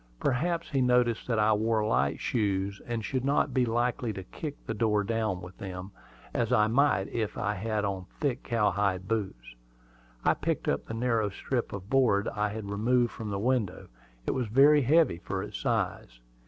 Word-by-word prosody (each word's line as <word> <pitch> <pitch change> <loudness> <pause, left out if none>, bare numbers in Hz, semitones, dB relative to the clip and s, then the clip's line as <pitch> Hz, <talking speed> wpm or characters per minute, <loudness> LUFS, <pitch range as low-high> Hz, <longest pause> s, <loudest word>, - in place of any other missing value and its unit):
Perhaps 170 +6 0
he 135 -2 +2
noticed 125 -2 +2
that 115 -3 0
I 110 0 +4
wore 110 0 +1
light 70 -7 +1
shoes, 100 -3 -1
and 115 -3 -3
should 130 +3 -2
not 140 +2 +1
be 125 -2 +2
likely 120 0 0
to 95 - -6
kick 145 - -6
the - - -2
door 105 -2 +1
down 110 -4 -1
with 90 +1 -10
them, 95 0 -6 0.4
as 120 0 0
I 110 -4 +5
might 115 -4 +2
if 110 -3 -2
I 105 - 0
had 105 +1 -2
on 95 -2 -3
thick 140 -3 0
cowhide 100 -5 0
boots. 95 - -3 0.7
I - - +5
picked - - -2
up - - 0
the 115 - -5
narrow 115 -3 +1
strip 120 +5 -3
of 100 -1 -7
board 115 -6 +3
I 105 0 -1
had 110 0 -6
removed 120 +3 +2
from 110 -2 -6
the 100 - -2
window; 110 -4 -1 0.4
it - - +1
was 125 -3 -1
very 140 +6 +6
heavy 145 - +3
for 95 +2 -4
its 105 -1 -6
size. - - -2
110 Hz, 185 wpm, -29 LUFS, 100-125 Hz, 0.7 s, very